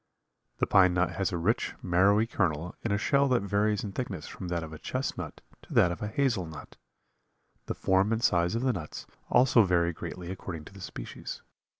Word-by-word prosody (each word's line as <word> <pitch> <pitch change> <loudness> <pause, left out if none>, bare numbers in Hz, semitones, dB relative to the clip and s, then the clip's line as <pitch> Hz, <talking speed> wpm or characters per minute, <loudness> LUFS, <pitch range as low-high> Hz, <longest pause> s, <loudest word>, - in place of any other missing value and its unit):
The - - +2
pine 90 -3 +5
nut 90 -1 +2
has 95 +3 -1
a 90 - -1
rich, 95 +8 0
marrowy 95 +5 +4
kernel 90 -6 -1
in 115 - -1
a 100 - +2
shell 140 +6 +3
that 125 -5 +2
varies 105 +1 +1
in 105 - -4
thickness 95 -8 -4
from 90 - -7
that 85 -1 -2
of 80 0 -8
a 80 - -8
chestnut - - -4 0.2
to - - -10
that 90 - +5
of 85 - -6
a 105 - -2
hazel 115 -6 0
nut. 80 -2 -10 0.9
The - - -2
form 95 +3 +2
and 115 +1 0
size 85 +1 +3
of 115 - -1
the 130 -1 +2
nuts 80 -7 -6 0.2
also 125 -1 +5
vary 85 -3 +2
greatly 85 +2 -6
according 90 -4 -6
to - - -13
the 100 - -12
species. - - -7
95 Hz, 205 wpm, -29 LUFS, 85-110 Hz, 0.9 s, pine